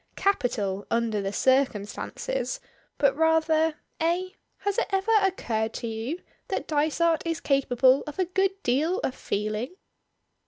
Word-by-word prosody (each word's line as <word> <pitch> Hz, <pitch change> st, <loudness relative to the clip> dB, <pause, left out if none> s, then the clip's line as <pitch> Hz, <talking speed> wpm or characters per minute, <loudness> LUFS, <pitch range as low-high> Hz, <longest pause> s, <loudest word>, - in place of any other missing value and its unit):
"Capital, 210 Hz, -, 0 dB
under 230 Hz, -3 st, +1 dB
the 195 Hz, 0 st, -2 dB
circumstances, 265 Hz, -, 0 dB, 0.4 s
but 280 Hz, -2 st, +3 dB
rather, 320 Hz, 0 st, +3 dB, 0.2 s
eh? 345 Hz, +3 st, +1 dB, 0.3 s
Has 405 Hz, +2 st, 0 dB
it -, -, 0 dB
ever 390 Hz, +2 st, +1 dB
occurred 225 Hz, -, -1 dB
to -, -, -4 dB
you 230 Hz, +10 st, -4 dB, 0.2 s
that -, -, -3 dB
Dysart 315 Hz, +2 st, +2 dB
is 330 Hz, -1 st, -2 dB
capable 265 Hz, -1 st, +3 dB
of 300 Hz, -, -7 dB
a 375 Hz, -, +2 dB
good 385 Hz, +2 st, 0 dB
deal 300 Hz, +9 st, +2 dB
of 260 Hz, -, 0 dB
feeling?" 215 Hz, -, -3 dB
300 Hz, 130 wpm, -27 LUFS, 235-360 Hz, 0.4 s, but